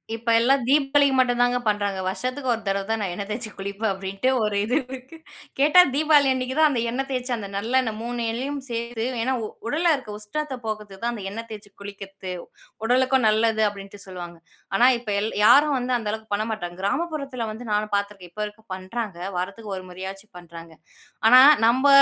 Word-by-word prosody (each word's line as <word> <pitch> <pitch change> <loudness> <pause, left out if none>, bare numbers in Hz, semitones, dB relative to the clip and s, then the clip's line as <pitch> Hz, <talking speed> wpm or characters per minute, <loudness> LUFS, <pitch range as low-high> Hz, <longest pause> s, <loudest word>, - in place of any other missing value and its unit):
இப்ப 230 +1 -4
எல்லாம் 265 +3 +3
தீபாவளிக்கு 280 0 +3
மட்டுதாங்க 245 -1 +3
பண்றாங்க. 205 -2 0
வருஷத்துக்கு 255 +7 -3
ஒரு 230 - -4
தடவை 195 0 0
தான் 225 - 0
நான் 190 -3 -2
எண்ணெய் 200 +2 -5
தேய்ச்சு 220 +1 -4
குளிப்பேன், 200 +2 -2
அப்படின்ட்டு 195 +5 -2
ஒரு 210 -1 -1
இது 245 +4 0
இருக்கு. 260 +4 -10 0.4
கேட்டா 305 +6 +7
தீபாவளி 300 -2 +4
அன்னைக்கு 260 +1 -3
தான் 310 -1 +6
அந்த 245 -5 0
எண்ணெய் 270 +3 -2
தேய்ச்சு, 250 -1 -3
அந்த 205 -3 -6
நல்லெண்ணெய் 225 +1 0
3 240 0 -3
எண்ணையும் 275 +5 -3
சேர்த்து 235 0 -3 0.2
ஏன்னா 260 +1 0
உ - - -3 0.2
உடல்ல 330 +6 +2
இருக்க 255 - -11
உஷ்ணத்த 270 +6 -4
போக்கறதுக்கு 210 -3 -6
தான் 240 0 0
அந்த 210 -4 -7
எண்ணெய் 230 +2 -6
தேய்ச்சி 210 -2 -10
குளிக்கறத்து. 195 -2 -8 0.5
உடலுக்கும் 260 +1 +3
நல்லது 220 0 +2
அப்படின்ட்டு 200 0 -11
சொல்லுவாங்க. 175 -2 -8 0.4
ஆனா 240 +5 +5
இப்ப 230 -3 -9
எல் 220 - -2
யாரும் 290 +4 +6
வந்து 250 0 -2
அந்த 220 -3 -6
அளவுக்கு 220 -1 -8
பண்ண 215 +1 -1
மாட்டாங்க. 175 -5 -5
கிராமப்புறத்துல 275 -1 -2
வந்து 225 +3 -9
நானும் 210 0 -1
பார்த்துருக்கேன். 200 -3 -4
இப்ப 210 - -6
வரைக்கும் 210 0 -9
பண்றாங்க. 190 0 -5 0.2
வாரத்துக்கு 200 +3 -4
1 185 - -7
முறையாச்சும் 190 +3 -8
பண்றாங்க. 170 -1 -12 0.6
ஆனா 255 +3 +9 0.3
நம்ப 260 +4 +3
225 Hz, 180 wpm, -24 LUFS, 200-255 Hz, 0.6 s, ஆனா